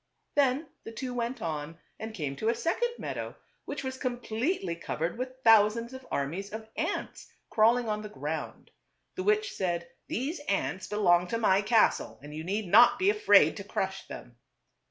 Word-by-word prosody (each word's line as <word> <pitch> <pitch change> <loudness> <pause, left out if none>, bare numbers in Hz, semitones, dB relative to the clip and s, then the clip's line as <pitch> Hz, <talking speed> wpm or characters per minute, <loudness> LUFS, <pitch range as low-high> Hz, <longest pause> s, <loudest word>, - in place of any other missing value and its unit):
Then 285 +2 +2 0.2
the 225 - -8
two 250 +2 -5
went 240 0 -3
on 160 0 -4 0.2
and 220 0 -5
came 145 -7 -3
to 220 - 0
a 235 - +2
second 475 - 0
meadow, - - -5 0.3
which 285 0 -5
was 260 0 -5
completely 245 - -2
covered 165 0 -3
with 255 +2 -5
thousands 225 +2 +5
of 260 0 -10
armies 170 +9 -3
of 220 0 -7
ants - - -3 0.2
crawling 230 +2 +4
on 210 -1 -1
the 210 - -7
ground. 150 0 -5 0.4
The 370 - -4
witch 420 +1 +2
said, 170 -2 -2
" - - -47
These 285 +8 -2
ants 190 -1 -1
belong 180 -4 +3
to 230 - -1
my 200 -4 +3
castle 215 +2 +2
and 150 0 -9
you 155 +1 -5
need 200 +5 -2
not 230 +7 +7
be 385 +2 +4
afraid 425 0 +5
to - - -6
crush - - -3
them." - - -10
220 Hz, 175 wpm, -29 LUFS, 180-255 Hz, 0.4 s, not